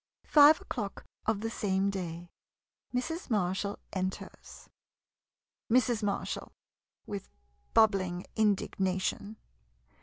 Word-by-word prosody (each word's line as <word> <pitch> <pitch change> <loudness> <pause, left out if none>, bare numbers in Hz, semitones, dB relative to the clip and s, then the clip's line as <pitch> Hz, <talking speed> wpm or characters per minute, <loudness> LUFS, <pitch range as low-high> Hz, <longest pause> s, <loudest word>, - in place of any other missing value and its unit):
Five 300 +1 +7
o'clock 205 -5 -5 0.2
of 220 -2 +1
the 225 0 -2
same 195 -2 0
day. 175 -2 -5 0.6
Mrs. 280 +8 -3
Mar 185 -6 +2
shall 200 +1 -3 0.2
enters. 185 0 -5 1.0
Mrs. 245 -1 +3
Marshall 205 -1 -2 0.5
[With 200 -2 -6 0.5
bubbling 190 -5 +3
indignation. 200 0 0
200 Hz, 90 wpm, -31 LUFS, 190-225 Hz, 1.0 s, Five